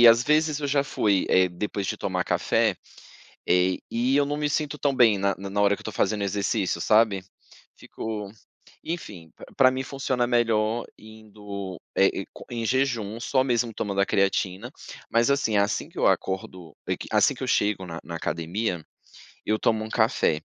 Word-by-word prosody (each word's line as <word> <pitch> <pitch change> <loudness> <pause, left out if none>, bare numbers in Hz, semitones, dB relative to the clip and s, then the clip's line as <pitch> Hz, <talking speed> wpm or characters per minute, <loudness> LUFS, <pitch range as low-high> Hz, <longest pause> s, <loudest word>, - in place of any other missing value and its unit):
e, 120 - +10
às 115 +1 +6
vezes, 150 +2 +2
eu 145 - -1
já 140 0 +2
fui, 100 -7 +1
eh, 95 0 +4
depois 100 +2 -4
de - - -2
tomar - - -2
café, - - +1 0.7
eh, 90 0 +3
e 125 +4 +1
eu 145 - +4
não 145 - -2
me 150 0 0
sinto 150 0 -1
tão 140 -2 +1
bem 115 -5 +5
na 100 0 +1
na 100 0 -6
na 100 +1 -1
hora 100 0 +4
que - - -15
eu - - -14
tô 110 - -5
fazendo 105 -2 0
exercício, 100 -2 -1
sabe? 105 -2 +3 0.5
Fico 105 -3 -6 0.5
enfim, 95 - -6
pr - - -11
pra 130 -1 +6
mim 130 0 -2
funciona 130 -2 -1
melhor, 115 -1 +1
indo, 105 -4 -9 0.2
eh, - - +6 0.2
e - - -13
co - - -11
em 120 -1 -3
jejum, 120 -5 0
só 120 +4 +2
mesmo 120 -3 0
tomando 100 -2 -2
a 100 - +3
creatina. 100 +3 0 0.4
Mas, 115 +4 +3
assim, 115 -7 +1
assim 100 +2 +1
que - - -12
eu - - +2
acordo 95 -3 -2
é - - 0
que, - - -9
assim - - +4
que - - -10
eu - - -1
chego 105 -2 +1
na 85 -1 -6
na 85 - -7
academia, 85 +3 -3 0.6
eu 110 0 +1
tomo 110 -1 +1
um 110 - -8
café, 110 -10 +1
110 Hz, 195 wpm, -25 LUFS, 100-120 Hz, 0.7 s, e